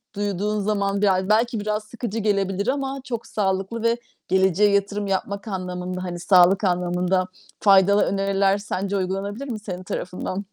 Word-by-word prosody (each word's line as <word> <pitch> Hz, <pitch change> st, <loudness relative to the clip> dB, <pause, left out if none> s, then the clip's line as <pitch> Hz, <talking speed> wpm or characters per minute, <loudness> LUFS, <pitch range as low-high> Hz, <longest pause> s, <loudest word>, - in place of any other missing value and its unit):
duyduğun 205 Hz, +1 st, -1 dB
zaman 200 Hz, -1 st, 0 dB
bi 200 Hz, -2 st, +4 dB
a 185 Hz, +1 st, 0 dB
belki 225 Hz, +1 st, +2 dB
biraz 210 Hz, +1 st, -2 dB
sıkıcı 225 Hz, 0 st, -5 dB
gelebilir 200 Hz, 0 st, 0 dB
ama 270 Hz, 0 st, -1 dB
çok 235 Hz, -3 st, -5 dB
sağlıklı 195 Hz, +3 st, -1 dB
ve 230 Hz, +1 st, +2 dB, 0.3 s
geleceğe 190 Hz, +2 st, +3 dB
yatırım 200 Hz, 0 st, 0 dB
yapmak 200 Hz, +2 st, -2 dB
anlamında, 185 Hz, -1 st, -4 dB
hani, 175 Hz, -1 st, -5 dB
sağlık 185 Hz, +2 st, +5 dB
anlamında 180 Hz, 0 st, +1 dB, 0.3 s
faydalı 200 Hz, 0 st, +5 dB
öneriler 195 Hz, 0 st, +1 dB
sence 200 Hz, -1 st, -3 dB
uygulanabilir 200 Hz, +7 st, -3 dB
mi 215 Hz, -, -4 dB
senin 185 Hz, -3 st, -6 dB
tarafından? 185 Hz, +2 st, -4 dB
200 Hz, 150 wpm, -23 LUFS, 185-210 Hz, 0.3 s, sağlık